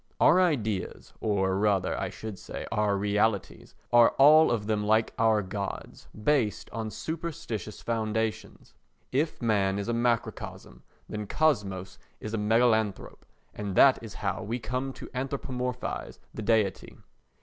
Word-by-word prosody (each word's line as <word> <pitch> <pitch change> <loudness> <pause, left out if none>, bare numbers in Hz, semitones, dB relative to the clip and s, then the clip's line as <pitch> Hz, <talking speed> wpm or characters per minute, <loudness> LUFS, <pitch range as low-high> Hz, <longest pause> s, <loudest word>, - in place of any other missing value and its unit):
Our 180 +4 +6
ideas, 110 - -1
or 95 -2 0
rather, 100 -3 +1
I - - -3
should 110 -3 -8
say, - - -7
our 105 -2 +1
realities, 105 +1 -1 0.2
are 120 -1 +6
all 155 +3 +7
of 110 -3 -1
them 105 -1 0
like 110 +1 +2
our 110 -2 +3
Gods, 100 +1 -6 0.2
based 120 -8 +1
on 110 0 -4
superstitious 115 - -5
foundations. 110 -1 -3 0.4
If 145 0 -1
man 100 -4 +2
is 100 - -3
a 120 - 0
microcosm 120 0 -2 0.3
then 105 -1 -5
kosmos 95 -12 0 0.2
is 110 - -6
a 110 - 0
megalanthrope 110 -1 +1 0.3
and 100 -3 -5
that 135 +4 +6
is 110 -4 -9
how - - -1
we 115 +4 -3
come 125 +3 -3
to - - -9
anthropomorphise 125 -1 -4 0.2
the - - -6
deity. 110 -3 0
110 Hz, 140 wpm, -28 LUFS, 105-125 Hz, 0.4 s, all